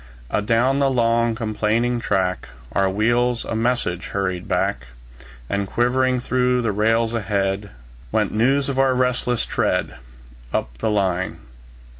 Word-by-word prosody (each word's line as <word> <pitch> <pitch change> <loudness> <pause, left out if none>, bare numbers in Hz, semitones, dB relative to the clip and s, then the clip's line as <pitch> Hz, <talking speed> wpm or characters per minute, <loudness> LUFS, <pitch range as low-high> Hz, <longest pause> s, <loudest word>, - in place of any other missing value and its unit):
Adown 115 +6 +2
the 140 -1 +3
long, 115 -2 +2
complaining 115 +2 0
track, 95 -4 -1 0.2
Our 95 +6 +2
wheels 120 +4 +1
a - - -3
message 115 -6 -1
hurried 95 -2 -2
back; 65 +1 -1 0.6
And 100 +4 -1
quivering 125 +3 +1
through 125 0 +1
the 115 - +1
rails 115 +3 +1
ahead, 100 -2 -1 0.4
Went - - +1
news 135 +6 +2
of 135 -1 -2
our 135 -1 +3
resistless 125 -1 0
tread, - - -1 0.5
Up - - -2
the - - 0
line. 95 -3 0
115 Hz, 130 wpm, -22 LUFS, 100-125 Hz, 0.6 s, the